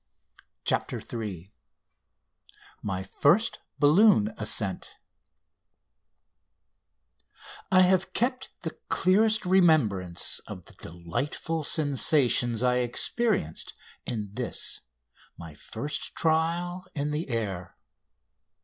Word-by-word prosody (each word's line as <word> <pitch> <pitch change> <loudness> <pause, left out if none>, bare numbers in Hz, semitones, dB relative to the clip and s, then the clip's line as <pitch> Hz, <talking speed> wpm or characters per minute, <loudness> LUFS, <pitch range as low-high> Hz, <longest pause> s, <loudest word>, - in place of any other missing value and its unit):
CHAPTER - - 0
III 100 -5 -7 1.3
MY 95 -2 -3
FIRST 170 - +2 0.2
BALLOON 150 - +4
ASCENT 105 -3 -1 2.8
I 185 -1 +6
have 185 0 +3
kept 255 +2 -1
the 160 - -7
clearest 215 +4 +3
remembrance 140 - +2
of 90 -5 -9
the - - -16
delightful 110 - -4
sensations 135 -5 +2
I 125 0 +3
experienced 125 - -1 0.3
in 105 -4 -5
this 125 +2 0 0.6
my 85 -2 -10
first 115 - -5
trial 170 +3 0
in 145 0 -2
the 150 0 -3
air. 100 -7 -4
140 Hz, 85 wpm, -27 LUFS, -, 2.8 s, I